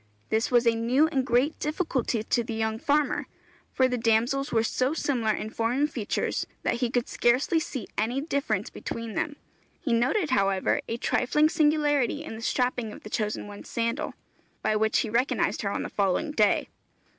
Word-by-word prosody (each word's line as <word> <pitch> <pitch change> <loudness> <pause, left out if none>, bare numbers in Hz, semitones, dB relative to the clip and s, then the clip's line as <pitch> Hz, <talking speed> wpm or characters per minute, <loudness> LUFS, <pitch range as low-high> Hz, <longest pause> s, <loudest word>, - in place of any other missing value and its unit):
This 220 +1 +1
was 240 -1 +4
a 230 - +5
new 240 +6 +3
and 270 -4 0
great 255 +4 +1
difficulty 285 - -1
to 235 +1 +1
the 225 0 -5
young 220 0 -1
farmer, 295 +3 +1 0.4
for 260 - +3
the 250 -1 -2
damsels 235 +5 +1
were 225 -1 +2
so 255 +5 0
similar 245 -8 0
in 215 +1 -3
form 230 +3 0
and 295 +2 +1
features, 215 -5 -2 0.2
that - - +1
he 245 - +2
could 245 0 0
scarcely 255 +7 +2
see 260 -8 -5
any 235 +5 0
difference 280 -1 -1
between 230 -1 -5
them. 295 +6 -2 0.4
He 250 - -1
noted, 265 - +1
however, 195 -5 +2
a 230 - -2
trifling 300 +6 +2
singularity 295 -3 +2
in 310 - -7
the 220 - -8
strapping 245 -2 0
of - - -11
the 215 - -9
chosen 215 -2 -2
one's 205 0 -10
sandal, 235 +6 -2 0.5
by 215 - +2
which 220 +1 +2
he 225 - -3
recognized 250 +5 +1
her - - -1
on - - -2
the - - -3
following 200 - 0
day. 215 -8 +2
245 Hz, 185 wpm, -27 LUFS, 225-280 Hz, 0.5 s, a